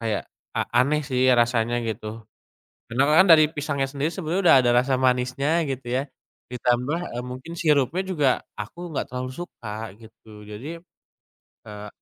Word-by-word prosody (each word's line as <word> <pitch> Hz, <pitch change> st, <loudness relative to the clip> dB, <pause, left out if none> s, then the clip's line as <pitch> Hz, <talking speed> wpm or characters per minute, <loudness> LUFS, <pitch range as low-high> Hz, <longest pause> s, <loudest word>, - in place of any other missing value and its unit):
kayak, 110 Hz, -3 st, -2 dB, 0.3 s
a -, -, +2 dB
a 120 Hz, -, +2 dB
aneh 150 Hz, +2 st, +1 dB
sih 130 Hz, -2 st, +1 dB
rasanya 120 Hz, -1 st, +2 dB
gitu. 110 Hz, 0 st, -5 dB, 0.7 s
Karena 125 Hz, +3 st, +2 dB, 0.2 s
kan 190 Hz, -, +7 dB
dari 155 Hz, -1 st, +8 dB
pisangnya 145 Hz, -2 st, -1 dB
sendiri 140 Hz, +3 st, -2 dB
sebenarnya 180 Hz, +1 st, -2 dB
udah 170 Hz, -, +8 dB
ada 120 Hz, -, +3 dB
rasa 130 Hz, +1 st, +1 dB
manisnya 130 Hz, +2 st, +1 dB, 0.2 s
gitu 130 Hz, -2 st, -6 dB
ya. 135 Hz, -, 0 dB, 0.5 s
Ditambah, 125 Hz, +5 st, 0 dB, 0.2 s
eee, 120 Hz, -, -3 dB
mungkin 130 Hz, +6 st, -8 dB
sirupnya 150 Hz, 0 st, +2 dB
juga 165 Hz, -8 st, +1 dB, 0.3 s
aku 170 Hz, +12 st, -7 dB
enggak 145 Hz, -, -2 dB
terlalu 130 Hz, 0 st, -4 dB
suka 110 Hz, -, -7 dB
gitu. 110 Hz, -2 st, -15 dB
Jadi, 120 Hz, +11 st, -8 dB, 0.9 s
eee, 105 Hz, -1 st, -8 dB
130 Hz, 155 wpm, -24 LUFS, 115-150 Hz, 0.9 s, dari